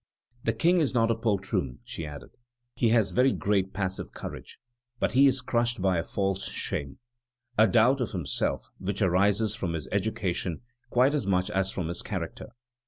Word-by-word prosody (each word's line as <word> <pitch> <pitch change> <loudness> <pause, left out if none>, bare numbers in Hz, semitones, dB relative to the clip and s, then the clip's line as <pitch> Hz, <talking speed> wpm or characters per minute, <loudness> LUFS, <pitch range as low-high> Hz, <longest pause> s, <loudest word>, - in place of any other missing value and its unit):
"The 115 - +2
King 170 +11 +3
is 145 -5 0
not 115 -1 +3
a - - +2
poltroon," 100 - -1
she 80 - -6
added; 75 -1 -9 0.4
"he 115 - +2
has 110 -3 +3
very 130 +2 +4
great 100 -4 0
passive 95 -1 -3
courage, - - -8 0.4
but - - +1
he 135 +2 +6
is 130 -1 +2
crushed 120 -2 0
by 95 -2 +2
a - - -1
false 95 +1 -1
shame, 70 -1 -2 0.6
a 110 0 +6
doubt 120 +7 +4
of 120 - -1
himself, 80 -10 -2
which 100 +2 -1
arises 100 +3 +3
from 95 -7 -3
his 80 -2 -4
education 95 -4 -1 0.3
quite 130 +4 +3
as 140 -9 -1
much 90 -1 +1
as 95 0 +1
from 90 -4 -3
his 85 +1 -3
character. - - -5
100 Hz, 175 wpm, -28 LUFS, 95-115 Hz, 0.6 s, he